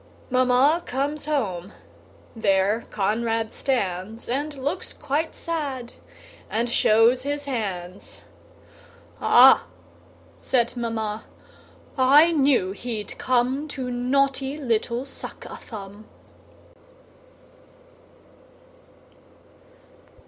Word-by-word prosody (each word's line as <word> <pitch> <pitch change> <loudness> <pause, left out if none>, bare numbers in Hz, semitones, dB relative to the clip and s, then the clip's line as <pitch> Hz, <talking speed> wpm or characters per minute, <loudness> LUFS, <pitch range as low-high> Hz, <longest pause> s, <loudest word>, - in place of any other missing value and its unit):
Mamma 255 +6 +4
comes 280 +4 -2
home: 200 - -2 0.6
there 200 +1 +1
Conrad 225 +2 -1
stands, 215 -4 -2
And 285 +4 -2
looks 290 +7 -3
quite 295 +3 -2
sad, 280 -7 -4 0.6
and 230 +3 0
shows 225 +4 +4
his 285 +1 -3
hands; 195 -8 -5 1.0
"Ah!" - - +7 0.7
said 240 -2 0
Mamma, 220 -3 -3 0.7
"I 290 +6 +6
knew 275 - +3
he'd 215 0 -5
come 255 +4 +1
To 260 -4 -5
naughty 270 +3 0
little 240 -2 -1
Suck 275 - -9
a - - -8
Thumb." 205 -1 -10
245 Hz, 80 wpm, -24 LUFS, 220-275 Hz, 1.0 s, Ah